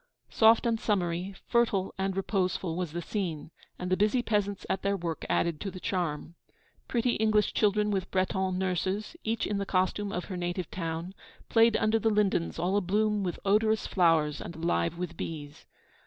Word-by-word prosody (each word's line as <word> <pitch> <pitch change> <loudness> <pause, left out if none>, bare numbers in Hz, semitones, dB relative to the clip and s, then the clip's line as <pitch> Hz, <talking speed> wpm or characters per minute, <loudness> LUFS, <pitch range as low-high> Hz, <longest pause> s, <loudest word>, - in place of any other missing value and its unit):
Soft 225 +1 +5
and 230 -1 +1
summery, 185 -2 -1
fertile 220 -5 +1
and 190 0 -2
reposeful, 185 -3 -1
was 175 -3 -3
the 175 +1 -4
scene; 165 -6 -3 0.3
and 180 0 -4
the - - +5
busy 215 +5 +2
peasants 205 -3 -1
at - - -1
their 200 0 0
work 170 -3 -4
added 170 -3 +1
to 200 - -3
the 185 - -8
charm. 170 -4 -2 0.5
Pretty 240 0 +1
English 215 -1 +2
children 210 0 +2
with 190 -2 -1
Breton 190 0 0
nurses, 190 - -1
each 225 0 -1
in 205 -1 -1
the - - 0
costume 190 +2 0
of 180 -2 -3
her 185 - -5
native 175 0 -3
town, 165 +1 -4 0.4
played 225 0 +5
under 220 +1 +2
the 225 - +2
lindens 205 -5 +1
all 180 +4 +1
abloom 210 +2 +1
with 180 -3 -2
odorous 215 +2 +3
flowers 160 -5 +2
and 170 - -7
alive 170 0 0
with 175 -1 -4
bees. 145 -3 -7
190 Hz, 175 wpm, -29 LUFS, 175-210 Hz, 0.5 s, Soft